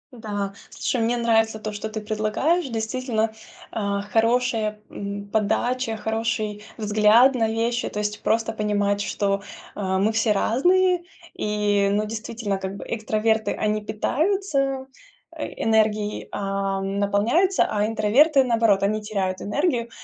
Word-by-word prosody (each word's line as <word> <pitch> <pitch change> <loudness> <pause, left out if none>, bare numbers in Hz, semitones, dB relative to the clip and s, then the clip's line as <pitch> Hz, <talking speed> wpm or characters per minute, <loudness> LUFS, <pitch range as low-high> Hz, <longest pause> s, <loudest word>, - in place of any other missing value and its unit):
Да, 205 -4 -4 0.2
слушай, 245 - -2
мне 240 +2 +1
нравится 225 -2 +2
то, 215 0 -4
что 205 +1 -5
ты 215 0 -4
предлагаешь. 215 +11 0
Действительно, 225 -1 -1 0.4
э, 200 -2 -1
хорошая, 225 -2 +1
м, 200 0 -6
подача, 225 +2 0
хороший 220 -1 -2
взгляд 215 +4 +5
на 225 -3 +1
вещи, 235 +2 -1
то - - -8
есть 210 0 -2
просто 225 0 +1
понимать, 205 -1 0
что, 200 -1 -1 0.3
а, 190 -2 -1
мы 210 +3 +2
все 225 0 +1
разные 355 - +3 0.3
и 205 -1 +1
ну, 210 +1 +1
действительно, 215 -2 -4
как 190 0 -5
бы - - -8
экстраверты- 220 -1 0
они 215 0 0
питаются, 275 - 0 0.5
э, - - -4 0.2
энергией, 215 -1 +1
а, 195 -1 -2
наполняются, 205 - +2
а 210 0 0
интроверты, 265 +7 +4
наоборот, 225 -5 +2
они 215 +2 +1
теряют 195 -3 -2
энергию. 240 - 0
220 Hz, 130 wpm, -24 LUFS, 205-235 Hz, 0.5 s, взгляд